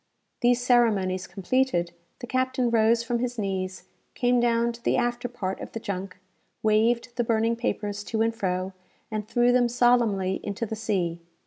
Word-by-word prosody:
These 245 Hz, 0 st, +4 dB
ceremonies 200 Hz, -7 st, +2 dB
completed, 195 Hz, -4 st, 0 dB, 0.3 s
the -, -, -4 dB
captain 255 Hz, 0 st, 0 dB
rose 230 Hz, +1 st, +3 dB
from 235 Hz, 0 st, -1 dB
his 245 Hz, 0 st, -3 dB
knees, 190 Hz, -2 st, -3 dB, 0.3 s
came 245 Hz, 0 st, +2 dB
down 235 Hz, 0 st, +2 dB
to 235 Hz, 0 st, -13 dB
the -, -, +2 dB
after 240 Hz, 0 st, -1 dB
part 195 Hz, -6 st, -4 dB
of -, -, -8 dB
the 225 Hz, -, -4 dB
junk, 195 Hz, -3 st, -5 dB, 0.5 s
waved 230 Hz, +3 st, +2 dB
the 240 Hz, -, +2 dB
burning 230 Hz, 0 st, +1 dB
papers 205 Hz, -4 st, -3 dB
to 220 Hz, -1 st, 0 dB
and 230 Hz, 0 st, +1 dB
fro, 185 Hz, -3 st, -2 dB, 0.4 s
and 215 Hz, -1 st, -3 dB
threw 240 Hz, +1 st, +3 dB
them 245 Hz, -1 st, +3 dB
solemnly 235 Hz, -6 st, +2 dB
into 205 Hz, +3 st, -3 dB
the 220 Hz, -, -4 dB
sea. 185 Hz, -6 st, -2 dB
230 Hz, 165 wpm, -26 LUFS, 195-240 Hz, 0.5 s, These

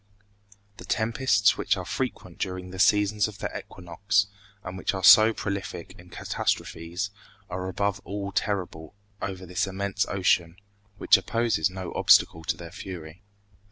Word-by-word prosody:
The -, -, -10 dB
tempests 110 Hz, -2 st, +2 dB
which -, -, +1 dB
are -, -, -5 dB
frequent -, -, -4 dB
during 90 Hz, 0 st, -4 dB
the 95 Hz, -, -8 dB
seasons 105 Hz, +1 st, +3 dB
of 105 Hz, -2 st, -10 dB
the -, -, -5 dB
equinox, 95 Hz, +3 st, -1 dB, 0.4 s
and 90 Hz, 0 st, -7 dB
which 95 Hz, +1 st, -2 dB
are 95 Hz, -, -5 dB
so 110 Hz, +4 st, +9 dB
prolific 100 Hz, -5 st, -5 dB
in 90 Hz, 0 st, -15 dB
catastrophes, 85 Hz, +2 st, -3 dB, 0.4 s
are 90 Hz, +1 st, -3 dB
above 100 Hz, +1 st, -1 dB
all 100 Hz, 0 st, -5 dB
terrible 90 Hz, -5 st, -3 dB, 0.3 s
over 95 Hz, -1 st, -5 dB
this 90 Hz, +2 st, -1 dB
immense 95 Hz, 0 st, -2 dB
ocean, 90 Hz, -3 st, +1 dB, 0.4 s
which -, -, +5 dB
opposes 110 Hz, -3 st, 0 dB
no 95 Hz, -1 st, -7 dB
obstacle 80 Hz, -, +4 dB
to -, -, -1 dB
their 85 Hz, -1 st, -9 dB
fury. 90 Hz, -2 st, -9 dB
95 Hz, 145 wpm, -26 LUFS, 90-100 Hz, 0.4 s, so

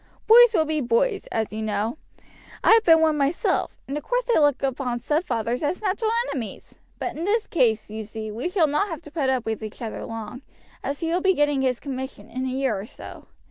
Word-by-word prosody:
Boys 465 Hz, 0 st, +8 dB
will 315 Hz, -, +3 dB
be 310 Hz, -1 st, -1 dB
boys, 465 Hz, -, +1 dB, 0.2 s
you 215 Hz, +1 st, -4 dB
know; 215 Hz, +2 st, -1 dB, 0.7 s
I -, -, +5 dB
have 450 Hz, 0 st, +7 dB
been 325 Hz, -4 st, +6 dB
one 315 Hz, -1 st, +3 dB
myself, 280 Hz, +4 st, 0 dB
and 275 Hz, -, -4 dB
of 295 Hz, -, -4 dB
course -, -, 0 dB
they 475 Hz, -8 st, +2 dB
look 290 Hz, -3 st, +2 dB
upon 255 Hz, -2 st, -1 dB
stepfathers 245 Hz, -, -1 dB
as 310 Hz, +4 st, -1 dB
natural 425 Hz, +2 st, 0 dB, 0.2 s
enemies; 230 Hz, -8 st, -7 dB, 0.2 s
but -, -, -4 dB
in 320 Hz, -, -4 dB
this 420 Hz, +4 st, +1 dB
case, 225 Hz, -, +1 dB
you 220 Hz, 0 st, -5 dB
see, 215 Hz, 0 st, -6 dB
we 235 Hz, +11 st, -3 dB
shall 360 Hz, -3 st, +3 dB
not 300 Hz, +8 st, +1 dB
have 330 Hz, -3 st, -6 dB
to 300 Hz, -, -12 dB
put 285 Hz, -4 st, 0 dB
up 255 Hz, -3 st, 0 dB
with 220 Hz, 0 st, -3 dB
each 215 Hz, -1 st, -7 dB
other 225 Hz, -3 st, -5 dB
long, 225 Hz, +3 st, -7 dB, 0.4 s
as 280 Hz, +3 st, -3 dB
he 330 Hz, 0 st, -1 dB
will 360 Hz, -, +1 dB
be 380 Hz, 0 st, +3 dB
getting 290 Hz, -2 st, +2 dB
his 255 Hz, -2 st, 0 dB
commission 265 Hz, -6 st, -6 dB
in 255 Hz, +2 st, -3 dB
a -, -, -1 dB
year 260 Hz, -3 st, 0 dB
or 200 Hz, -, -7 dB
so. -, -, -11 dB
280 Hz, 220 wpm, -24 LUFS, 235-340 Hz, 0.7 s, Boys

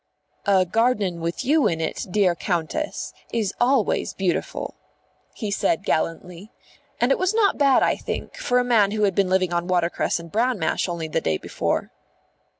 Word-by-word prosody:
"A 190 Hz, -2 st, +4 dB
garden 210 Hz, -3 st, +1 dB
with 170 Hz, +9 st, -3 dB
you 290 Hz, -2 st, +4 dB
in 165 Hz, -5 st, -1 dB
it, 160 Hz, -, -3 dB
dear 185 Hz, -1 st, +3 dB
Countess, 175 Hz, -, -3 dB, 0.2 s
is 215 Hz, -4 st, -1 dB
always 245 Hz, -3 st, +2 dB
beautiful," 185 Hz, -3 st, -2 dB, 0.6 s
he 215 Hz, -4 st, -4 dB
said 185 Hz, -4 st, 0 dB
gallantly. 170 Hz, +5 st, -2 dB, 0.5 s
And 245 Hz, +3 st, +2 dB
it -, -, +2 dB
was 370 Hz, +3 st, +1 dB
not 415 Hz, -7 st, +2 dB
bad, 275 Hz, -2 st, +5 dB
I -, -, +2 dB
think, -, -, -5 dB
for -, -, 0 dB
a 250 Hz, -, +3 dB
man 225 Hz, -5 st, +3 dB
who 210 Hz, +1 st, -1 dB
had 200 Hz, -2 st, +3 dB
been 195 Hz, 0 st, +1 dB
living 185 Hz, -2 st, +1 dB
on 175 Hz, 0 st, -1 dB
watercress 175 Hz, -2 st, 0 dB
and 170 Hz, -1 st, -11 dB
bran 240 Hz, +2 st, +1 dB
mash 160 Hz, +1 st, -1 dB
only 170 Hz, -2 st, -3 dB
the 160 Hz, +1 st, -1 dB
day 80 Hz, -, 0 dB
before. -, -, -2 dB
195 Hz, 175 wpm, -23 LUFS, 175-245 Hz, 0.6 s, bad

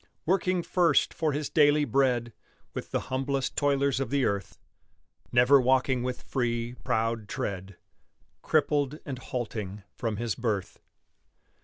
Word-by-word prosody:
Working 185 Hz, 0 st, +1 dB
first 175 Hz, -1 st, +2 dB
for 160 Hz, -2 st, 0 dB
his 145 Hz, 0 st, -3 dB
daily 150 Hz, -1 st, +4 dB
bread 125 Hz, -4 st, +1 dB, 0.4 s
With -, -, -6 dB
the -, -, -1 dB
humblest 135 Hz, 0 st, -1 dB
toilers 140 Hz, -2 st, +2 dB
of 135 Hz, -4 st, -2 dB
the 140 Hz, -1 st, +1 dB
earth; 100 Hz, -2 st, -2 dB, 0.7 s
Never 125 Hz, +3 st, +6 dB
walking 130 Hz, 0 st, +2 dB
with 125 Hz, 0 st, -4 dB
free, 120 Hz, -2 st, -2 dB
proud 110 Hz, -1 st, -1 dB
tread 100 Hz, -8 st, -4 dB, 0.6 s
Crippled 145 Hz, -1 st, +1 dB
and 135 Hz, -4 st, -5 dB
halting 105 Hz, -6 st, -5 dB
from 115 Hz, -4 st, -3 dB
his 115 Hz, -1 st, -1 dB
birth. 110 Hz, -6 st, -3 dB
130 Hz, 130 wpm, -28 LUFS, 115-140 Hz, 0.7 s, Never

